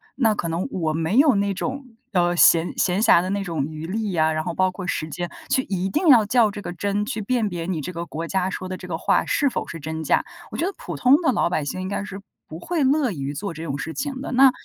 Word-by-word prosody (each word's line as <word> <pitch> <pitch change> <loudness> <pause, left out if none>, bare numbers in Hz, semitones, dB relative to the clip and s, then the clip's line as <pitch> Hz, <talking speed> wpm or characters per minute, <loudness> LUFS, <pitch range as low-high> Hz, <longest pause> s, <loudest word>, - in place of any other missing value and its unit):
那 225 -5 +3
可 175 - -3
能 165 +2 -2
我 160 -4 -1
没 165 +7 0
有 275 -4 +6
那 200 0 +1
种， 265 +7 -4 0.3
呃， 175 -1 +2
闲 165 0 +5
闲 185 +2 +1
暇 175 -6 +6
的 185 - -3
那 200 0 -1
种 165 -7 -2
余 155 +1 -7
力 210 +2 -2
呀， 160 -3 +2
然 155 0 -1
后 - - -3
包 185 +1 +2
括 185 0 -7
时 155 -3 -2
间 175 +2 -4 0.2
去 260 - +2
一 190 -1 -2
定 345 - 0
要 240 -7 +7
较 230 0 +4
这 205 - -7
个 175 - -5
真， 205 +3 -1
去 215 0 -3
辨 225 -1 0
别 170 -2 -4
你 170 -3 -2
这 180 - -5
个 170 0 -5
国 165 +1 -5
家 190 -1 0
说 185 - -5
的 185 - -4
这 180 - -10
个 165 -2 -3
话 - - +2
是 285 -3 +2
否 - - -3
是 165 - -7
真 160 +1 -5
假， - - +2 0.3
我 - - -5
觉 335 - 0
得 390 - -2
普 - - -6
通 255 +2 +5
的 260 - +4
老 215 - +1
百 155 -4 -1
姓 185 +6 -4
应 185 - -4
该 200 +1 -3
是 200 -1 -8 0.3
不 160 - -8
会 325 - -1
乐 270 -2 +2
于 140 -5 -4
做 195 +8 -4
这 160 +1 -7
种 140 -3 -3
事 160 +3 -4
情 265 - -3
的， - - -5
那 265 +1 +7
185 Hz, 300 characters per minute, -23 LUFS, 165-225 Hz, 0.3 s, 要